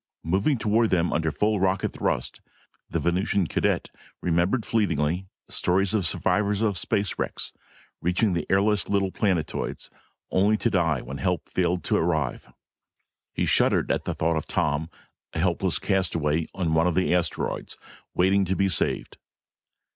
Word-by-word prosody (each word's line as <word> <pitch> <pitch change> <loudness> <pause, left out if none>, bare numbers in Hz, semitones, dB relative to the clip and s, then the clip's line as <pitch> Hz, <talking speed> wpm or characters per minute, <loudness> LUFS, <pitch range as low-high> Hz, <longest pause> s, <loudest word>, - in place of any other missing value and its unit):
Moving 100 - +1
toward 110 +1 +2
them 85 -1 +1
under 80 0 +1
full 105 +7 0
rocket 95 0 0
thrust, - - -2 0.5
the - - -1
Venusian 95 +2 +1
cadet - - 0 0.3
remembered 90 +7 +1
fleetingly 90 -4 0 0.2
stories 95 +3 +1
of 100 -6 +2
survivors 105 +3 +1
of 105 -3 +1
space 100 +3 -1
wrecks, - - -2 0.5
reaching 90 +4 +1
the 85 - -2
airless 100 +2 +2
little 100 -2 +1
planetoids, 90 -7 -2 0.4
only 100 +3 +3
to 115 - 0
die 80 - +1
when 65 +2 -7
help 90 -4 -1
failed 90 0 0
to - - +1
arrive. 80 -6 -1 0.8
He - - -1
shuddered - - +3
at - - -1
the - - -2
thought 80 0 +1
of 80 - -4
Tom, 80 -3 0 0.4
a - - -3
helpless 90 +1 +1
castaway 80 -5 0
on 90 -4 0
one 80 +2 +3
of 90 - 0
the 90 -1 +2
asteroids, 90 -2 -2 0.4
waiting 95 +2 +3
to 95 +1 -1
be 100 0 +2
saved. - - -1
90 Hz, 150 wpm, -25 LUFS, 85-100 Hz, 0.8 s, only